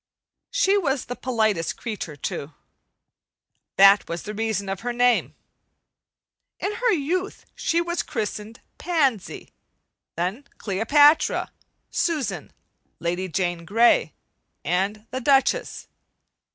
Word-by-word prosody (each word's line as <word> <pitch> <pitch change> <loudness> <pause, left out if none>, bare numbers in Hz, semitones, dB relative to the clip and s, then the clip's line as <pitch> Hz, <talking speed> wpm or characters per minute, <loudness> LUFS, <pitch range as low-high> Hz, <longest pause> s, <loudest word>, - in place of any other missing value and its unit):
She 410 -5 +2
was 275 -7 -1
the 245 - -5
politest 215 -10 0
creature, 210 -10 -5
too. 145 +1 -5 1.2
That 195 +1 +6
was 170 +1 -4
the 210 - -6
reason 215 -2 -2
of 195 -1 -3
her 245 +1 -3
name. 245 0 +2 1.2
In 400 - -2
her 475 +2 +1
youth 365 +3 -2
she 335 +1 0
was 345 0 -2
christened 215 0 -5 0.2
"Pansy"; 280 - -1 0.6
then 185 - -3
"Cleopatra," 285 +10 +3 0.4
"Susan," 315 -6 -2 0.5
"Lady 175 +2 -2
Jane 175 -1 -2
Grey" 225 +7 +3 0.5
and 200 +4 -1
the 260 +1 -3
"Duchess." 275 - +1
230 Hz, 105 wpm, -24 LUFS, 195-290 Hz, 1.2 s, That